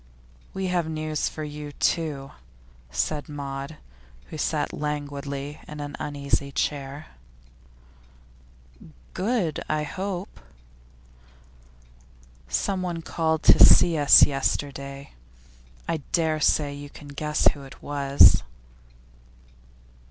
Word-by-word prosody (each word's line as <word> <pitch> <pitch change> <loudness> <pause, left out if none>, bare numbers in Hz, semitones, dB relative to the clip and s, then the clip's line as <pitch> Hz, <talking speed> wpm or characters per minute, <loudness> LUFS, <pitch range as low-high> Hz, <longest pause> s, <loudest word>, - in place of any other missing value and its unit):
'We 190 0 -2
have 170 -3 0
news 155 -1 -2
for 155 - -7
you, 150 0 -7
too,' 145 -4 -1 0.6
said 145 - -2
Maud, 140 +1 -6 0.5
who 155 - -6
sat 150 0 -1
languidly 145 -1 -4
on 150 - -8
an 145 -1 -5
uneasy 140 -1 -2
chair. 140 +1 -3 2.1
'Good, 190 -7 -1
I 155 0 0
hope?' 190 +4 -5 2.1
'Someone 170 - -2
called 160 -1 -1
to - - +8
see 170 -2 +7
us 145 -2 +8
yesterday. 140 0 -3 0.8
I 165 - 0
dare 160 -2 +1
say 145 -1 +2
you 145 0 -9
can 145 0 -13
guess 150 +1 -2
who 145 - -11
it 135 -1 -13
was. 140 -1 +5
150 Hz, 100 wpm, -25 LUFS, 140-160 Hz, 2.1 s, to